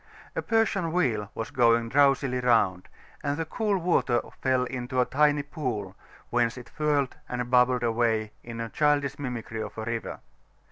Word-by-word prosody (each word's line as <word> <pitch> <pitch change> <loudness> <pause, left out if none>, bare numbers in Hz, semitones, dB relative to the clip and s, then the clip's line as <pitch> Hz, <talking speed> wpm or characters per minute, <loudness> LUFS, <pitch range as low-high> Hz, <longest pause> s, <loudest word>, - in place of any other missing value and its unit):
A - - 0
Persian 210 -7 +1
wheel 115 - 0
was 115 - -4
going 115 -2 +3
drowsily 135 -1 +3
round, 110 -7 +2 0.3
and 145 0 -1
the 165 - -2
cool 210 +3 0
water 165 -9 +2 0.2
fell 130 -1 +2
into 125 0 -3
a 125 - +4
tiny 145 +2 +2
pool, 125 - -4 0.4
whence 120 0 +1
it 125 - -10
whirled 145 -3 +1
and 125 0 -3
bubbled 125 -1 +4
away 115 -2 +1
in 115 -1 -5
childish 145 -2 +1
mimicry 120 -4 -4
of - - -7
a 110 - -4
river. 115 0 -4
125 Hz, 155 wpm, -27 LUFS, 115-145 Hz, 0.4 s, a